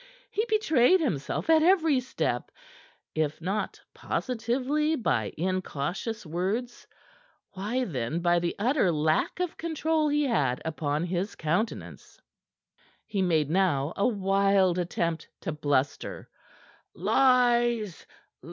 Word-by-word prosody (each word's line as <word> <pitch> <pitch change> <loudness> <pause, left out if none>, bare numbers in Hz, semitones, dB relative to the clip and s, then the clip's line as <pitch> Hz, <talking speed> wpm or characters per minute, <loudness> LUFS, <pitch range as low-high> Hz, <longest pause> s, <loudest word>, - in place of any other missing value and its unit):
He 430 - 0
betrayed 370 - +4
himself 175 - -2
at 320 -1 +5
every 325 -5 +4
step, 255 +1 -2 0.6
if 155 -1 -1
not 195 +6 -3
positively, 260 +6 -1
by 115 - 0
incautious 185 +4 -3
words, 195 +10 -3 0.6
why 215 +7 -2
then 135 - -2
by 175 0 +3
the 170 0 -2
utter 235 - +2
lack 155 - 0
of 360 -2 -2
control 320 -1 0
he 295 0 +2
had 140 - +1
upon 150 -1 -1
his 180 +3 -2
countenance. 175 +9 -3 0.9
He 210 -3 -2
made 160 -5 +1
now 165 -6 +1
a 200 - +2
wild 195 -3 +2
attempt 170 -2 -2
to - - -3
bluster. 145 -2 -1 0.7
"Lies! 240 -6 +2
195 Hz, 110 wpm, -27 LUFS, 165-255 Hz, 0.9 s, at